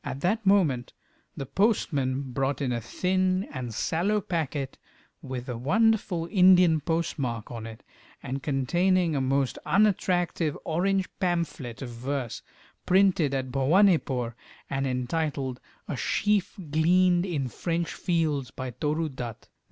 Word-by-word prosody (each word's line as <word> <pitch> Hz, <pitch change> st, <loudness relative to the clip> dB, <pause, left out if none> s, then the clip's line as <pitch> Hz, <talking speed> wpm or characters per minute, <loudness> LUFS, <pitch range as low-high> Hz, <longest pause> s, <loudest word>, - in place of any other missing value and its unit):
At 135 Hz, -, -5 dB
that 215 Hz, +5 st, +1 dB
moment 155 Hz, -, +3 dB, 0.4 s
the 135 Hz, -, -4 dB
postman 140 Hz, -, 0 dB
brought 135 Hz, +2 st, -1 dB
in 135 Hz, -3 st, -1 dB
a 120 Hz, -1 st, -1 dB
thin 185 Hz, -, 0 dB
and 125 Hz, -3 st, -4 dB
sallow 175 Hz, -, 0 dB
packet 155 Hz, -7 st, -3 dB, 0.4 s
with 130 Hz, -4 st, -6 dB
a 125 Hz, -, -3 dB
wonderful 180 Hz, -, +1 dB
Indian 180 Hz, -4 st, +6 dB
postmark 140 Hz, -, -2 dB
on 115 Hz, -2 st, -6 dB
it, 115 Hz, 0 st, -11 dB, 0.4 s
and 135 Hz, +2 st, -4 dB
containing 170 Hz, +5 st, +1 dB
a 135 Hz, -, +1 dB
most 135 Hz, 0 st, 0 dB
unattractive 180 Hz, -6 st, +1 dB
orange 190 Hz, +4 st, +1 dB
pamphlet 165 Hz, -, -2 dB
of 125 Hz, -, -6 dB
verse, 125 Hz, +1 st, -4 dB, 0.5 s
printed 180 Hz, -7 st, +3 dB
at 130 Hz, -1 st, -3 dB
Bhowanipore, 135 Hz, -, +3 dB, 0.4 s
and 135 Hz, 0 st, 0 dB
entitled 130 Hz, 0 st, -2 dB, 0.3 s
"A -, -, -3 dB
Sheaf 205 Hz, -, 0 dB, 0.2 s
gleaned 175 Hz, +3 st, +4 dB
in 145 Hz, -7 st, -1 dB
French 170 Hz, +5 st, -2 dB
Fields, 155 Hz, -7 st, 0 dB
by 130 Hz, +3 st, -6 dB
Toru 150 Hz, +6 st, -1 dB
Dutt." 125 Hz, -6 st, -7 dB
150 Hz, 130 wpm, -27 LUFS, 130-180 Hz, 0.5 s, Indian